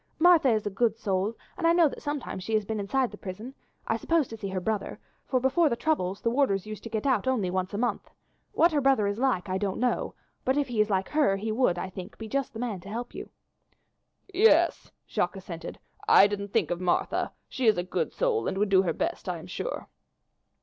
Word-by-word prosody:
Martha 335 -4 +6
is 215 -3 +1
a 205 - -1
good 220 +2 +1
soul, 200 +1 -1 0.2
and 335 - +2
I 335 - +5
know 340 -2 +5
that - - -7
sometimes 290 -10 -4
she 220 +3 -1
has 215 -1 +1
been 220 +1 -3
inside 250 +5 0
the - - -11
prison, 210 +7 -7 0.3
I - - 0
suppose 330 -5 +1
to 225 - -6
see 210 -2 -5
her 190 -1 -2
brother, 205 +1 -2 0.3
for 255 - +1
before 285 +6 +3
the 235 - 0
troubles 230 -9 -1
the 230 - +1
warders 230 -8 +1
used 215 -1 -7
to - - -5
get 220 +1 -3
out 260 -1 +2
only 215 -9 +1
once 185 0 -1
a 205 - -4
month. 235 -2 -1 0.4
What 340 +2 +4
her 295 -2 +1
brother 270 -6 +3
is 200 +2 -1
like 250 -8 +1
I 185 0 -1
don't 195 -2 -2
know, 250 0 0 0.3
but 260 +2 +1
if 285 -2 0
he 225 -3 +2
is 215 - +1
like 190 -1 0
her 295 -10 +3
he 215 +3 -3
would, 215 -6 +2
I 185 - -3
think, 185 -1 -9
be 225 - -7
just 275 +4 -1
the 225 - -7
man 230 -6 -3
to 190 +3 -11
help 235 +3 -5
you." - - -7 1.0
"Yes," 425 +5 +4 0.2
Jacques - - -1
assented, - - -7 0.3
"I - - +8
didn't 200 -1 -3
think 205 -9 +1
of 175 +1 -2
Martha. 180 -1 0 0.2
She 255 -3 -1
is 215 - +5
a 175 - 0
good 180 -2 -2
soul - - 0
and - - -2
would 205 0 +1
do 190 -1 +6
her 175 -4 0
best, 335 - -3
I - - -2
am - - -10
sure." - - -5
220 Hz, 240 wpm, -27 LUFS, 195-270 Hz, 1.0 s, I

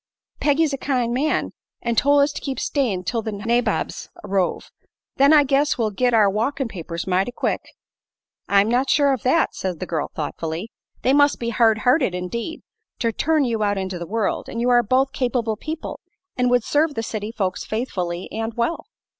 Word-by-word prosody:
Peggy's 295 0 +2
a 275 - -3
kind 250 -4 0
man, 285 +5 0 0.3
an' 235 - 0
tol' 285 +5 +4
us 285 +1 +3
to - - -6
keep 270 -2 -4
stayin' 230 -11 0
'til 230 +5 -1
the 220 - -4
nabobs 225 +2 -1
arrove. 195 -2 -1 0.5
Then 275 +2 +6
I 300 -2 +7
guess 280 +2 +2
we'll 220 -3 0
git 245 +5 +1
our 220 -3 +5
walkin' 240 +7 -1
papers, 170 -4 -6
mighty 190 +4 +1
quick." - - -1 0.9
"I'm 200 +1 +4
not 250 +4 +1
sure 285 -2 +4
of 260 - -3
that," 320 +6 +2
said 180 -4 -4
the - - -3
girl, 160 -4 -2
thoughtfully. 160 +6 -4 0.3
"They 260 - +3
must 285 0 +4
be 235 - -2
hard 225 -1 +3
hearted, 250 - +3
indeed, 235 - -4 0.3
to 230 - 0
turn 310 +5 +1
you 230 -3 -1
out 205 -1 +1
into 190 -2 -3
the 170 - -6
world; 220 +2 -1
and 230 - -5
you 245 +1 +2
are 240 0 +6
both 260 +4 +1
capable 245 -4 0
people, 310 +8 -6 0.4
and 250 -1 +2
would 245 -2 +3
serve 295 +3 +1
the 225 - -2
city 215 -1 -4
folks 190 -5 -2
faithfully 185 -6 -3
and 225 0 -3
well." 240 +12 -1
235 Hz, 190 wpm, -22 LUFS, 205-275 Hz, 0.9 s, I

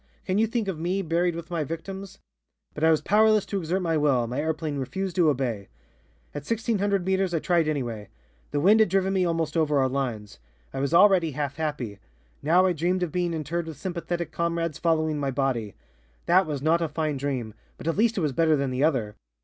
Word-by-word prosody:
Can 185 +2 0
you 225 - +3
think 230 -2 -2
of 180 -5 -3
me 185 +4 -1
buried 170 +1 0
with 170 +1 -8
my 165 -3 -1
victims? 190 +6 -7 0.6
But 150 - -5
I 160 - +6
was 160 -1 +3
powerless 215 0 +4
to 200 - -2
exert 180 +2 -1
my 165 -2 +1
will, 140 -5 +2
my 125 +4 -3
airplane 155 -2 -2
refused 180 +8 -3
to 170 -3 +5
obey. 125 -8 -2 0.7
"At 145 - -5
1,600 205 - 0
meters 190 -2 +1
I - - +1
tried 170 -1 +1
anyway. 120 -9 -3 0.4
The 145 - -1
wind 205 +8 +5
had 220 - +4
driven 190 +1 +1
me 185 -2 +2
almost 165 -2 -1
over 155 -3 +2
our 135 -1 +3
lines. 120 - -4 0.3
I - - -3
was 140 +1 -1
already 180 -5 +5
half 140 0 -3
happy. 140 -10 -3 0.4
Now 175 +5 +4
I 185 - +2
dreamed 180 +3 0
of 170 - -2
being 175 0 -1
interred 165 +1 -3
with 160 -4 -7
sympathetic 175 0 -4
comrades 170 -2 -2
following 160 -2 +1
my 140 -1 -1
body. 125 -6 -1 0.5
That 180 +1 +4
was 145 -3 -4
not 165 +2 +3
a 165 - +1
fine 155 -1 -2
dream, 130 -5 -3 0.2
but - - -8
at 165 - +1
least 225 +2 +2
it - - +1
was 150 -3 +1
better 160 +2 +3
than 140 -2 -1
the 130 +2 0
other. 120 -9 +1
160 Hz, 215 wpm, -26 LUFS, 140-180 Hz, 0.7 s, I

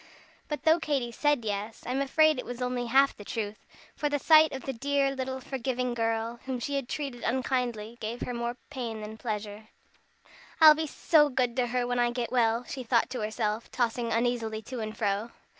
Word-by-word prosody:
But 300 - -4
though 320 +1 +5
Katy 275 -7 -1
said 290 -1 +1
yes, 210 +1 -4
I 245 - -3
am 265 +2 0
afraid 310 +1 +4
it - - -3
was 245 0 -6
only 250 -1 -2
half 270 +3 +4
the 205 - -10
truth, 210 -1 -5 0.3
for 295 - -1
the 290 - +1
sight 315 +2 +6
of 265 - -6
the 270 - -3
dear 275 +2 +1
little 260 0 -3
forgiving 255 -1 -2
girl, 230 0 -1
whom 260 -1 -3
she 285 +4 -3
had 275 -3 -2
treated 275 -5 -4
unkindly, 240 -3 -1
gave 225 +2 -4
her 245 - -3
more 235 +1 -3
pain 235 -6 -4
than 215 +1 -8
pleasure. 215 -1 -5 0.9
"I'll 310 -1 +10
be 315 +1 -2
so 295 0 +4
good 250 -3 0
to 250 -1 +2
her 245 0 0
when 245 0 -1
I 240 0 +3
get 240 -1 -3
well," 235 -1 +2
she 260 +2 -6
thought 235 -1 +1
to 255 - -3
herself, 215 +1 -2
tossing 235 -1 -1
uneasily 225 -1 0
to 255 +2 -6
and 215 0 -5
fro. 205 +1 0
245 Hz, 205 wpm, -28 LUFS, 225-270 Hz, 0.9 s, I'll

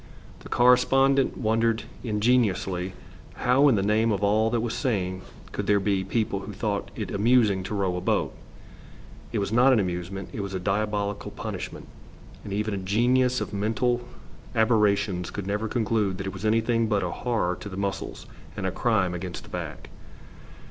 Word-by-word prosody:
The - - -12
correspondent 135 +2 +4
wondered 115 0 +1 0.2
ingenuously 105 -5 +1 0.4
how 130 +4 +4
in 135 - +5
the 100 - +1
name 110 +2 +2
of 100 -1 -1
all 110 +2 +3
that 120 0 0
was 115 0 -2
sane 95 -8 -1 0.3
could - - -4
there 105 -1 +4
be 100 -1 0
people 100 0 -1
who 105 +1 -8
thought 100 -1 -2
it 105 -4 -4
amusing 105 -2 +3
to 95 +3 -4
row 95 -3 0
a 90 - -3
boat. - - 0 1.0
It 115 - -2
was 100 -1 -1
not 125 +4 +5
an 120 - +4
amusement; 90 +1 -3
it 105 - -3
was 100 -1 -4
a - - -1
diabolical 100 +1 -1
punishment, - - -6 0.6
and 100 - -7
even 105 +1 -1
a - - -1
genius 120 +6 +2
of 105 0 -4
mental 115 +4 0 0.5
aberrations 105 -5 +2
could 100 - -5
never 105 +3 -1
conclude 110 -4 0
that 95 - -5
it 95 - -4
was 95 +3 -6
anything 115 +1 +2
but 105 -3 +1
a 90 - -2
horror 110 -7 -1
to 105 - -8
the 95 - -7
muscles 100 -1 -4 0.3
and 100 - -3
a 95 - 0
crime 100 -6 +1
against 90 0 -5
the - - -14
back. - - -6
105 Hz, 175 wpm, -26 LUFS, 95-115 Hz, 1.0 s, in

